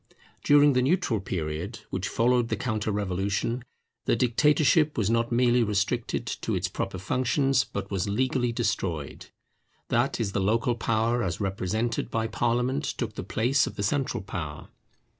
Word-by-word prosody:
During 145 0 +6
the 125 - +3
neutral 135 - +1
period 90 +4 -4
which 95 0 -2
followed 120 0 +2
the 110 - 0
counter 110 -1 -2
revolution, 100 +4 -1 0.4
the - - +3
dictatorship 150 +5 +3
was 110 -1 +1
not 115 +1 +1
merely 120 0 +3
restricted 110 +3 -1
to 115 -2 -3
its 90 +1 0
proper 95 +1 -4
functions, 130 - +1
but 100 0 -6
was 100 0 -1
legally 125 +2 +1
destroyed; 90 - -2 0.6
that - - +1
is 105 -4 -1
the 100 - -1
local 115 +5 +2
power 115 +1 0
as 85 -6 -2
represented 100 +4 -1
by 110 0 -1
parliament 120 +5 0
took 115 -6 -3
the - - -5
place 120 +8 +1
of - - -7
the 100 - -3
central 130 0 -1
power. 75 -6 -6
115 Hz, 155 wpm, -27 LUFS, 100-125 Hz, 0.6 s, During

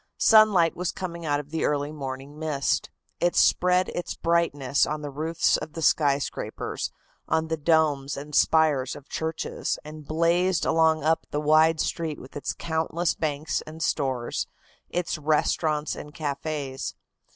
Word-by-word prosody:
Sunlight 210 -7 +5
was 180 0 -2
coming 170 -3 -6
out 145 -1 +1
of 145 0 -9
the 160 - -1
early 145 0 0
morning 140 0 -7
mist. 150 -3 0 0.3
It 175 0 +1
spread 180 +1 +4
its 175 - -4
brightness 145 -5 +1
on 150 0 -3
the 145 - -5
roofs 160 +4 +1
of 160 - -7
the 165 - -5
skyscrapers, 145 -3 0 0.4
on 160 0 0
the 160 - +1
domes 150 -3 +1
and 150 +2 -8
spires 150 -4 +3
of 145 -1 -13
churches, 160 0 -3
and 155 0 -9
blazed 170 +3 +2
along 160 -2 +3
up 160 +1 +1
the 145 - -2
wide 155 +1 +4
street 160 -3 -2
with 130 - -13
its 145 - -3
countless 165 +1 -1
banks 155 0 -2
and 160 +1 -6
stores, 130 -7 -1 0.4
its 175 -2 -2
restaurants 155 0 +1
and 150 0 -10
cafes. 145 -2 -4
155 Hz, 150 wpm, -26 LUFS, 145-165 Hz, 0.4 s, Sunlight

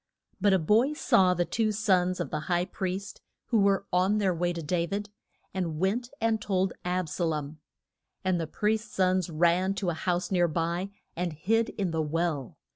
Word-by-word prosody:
But 205 0 +4
a 190 - +5
boy 220 - +3
saw 185 -11 +3
the 175 0 +1
two 220 +2 0
sons 185 -4 +2
of - - -3
the 155 - -1
high 175 0 +2
priest 190 +1 -4 0.3
who 230 - +3
were 200 0 +3
on 185 +4 +3
their 195 -3 +2
way 175 +1 0
to 170 -1 -5
Da 170 +2 0
vid, 205 +2 -4 0.4
and 170 -5 -2
went 210 +8 0
and 225 -1 +1
told 190 -2 0
Ab 180 -1 -1
sa 175 - -3
lom. 155 -1 -3 0.7
And 180 -2 +1
the 160 - -3
priest's 215 +5 -1
sons 185 -1 +2
ran 175 +4 +2
to 190 -3 -1
a - - -3
house 175 +2 -1
near 175 -2 +3
by, 170 +4 -1 0.3
and 175 -1 -2
hid 220 +9 +1
in 190 -4 -2
the 160 -1 0
well. 155 -3 -2
185 Hz, 195 wpm, -28 LUFS, 170-200 Hz, 0.7 s, a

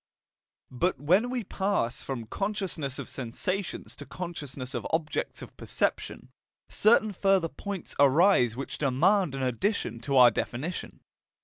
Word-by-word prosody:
But 170 +9 0
when 185 +11 +3
we 250 -2 -2
pass 195 - -1
from 125 -4 -5
consciousness 185 - -3
of - - -6
sensations 175 +10 -4
to - - -8
consciousness 145 -7 -6
of 120 -3 -3
objects 160 -1 -2
of - - -12
perception, - - -2 0.4
certain 215 0 +4
further 195 -3 +2
points 200 -1 -6
arise 140 - +5
which 135 +2 -6
demand 155 +4 +2
an 135 - -3
addition 125 - -1
to 135 +3 0
our 125 -2 +8
definition. 150 +10 -4
160 Hz, 130 wpm, -28 LUFS, 130-195 Hz, 0.4 s, our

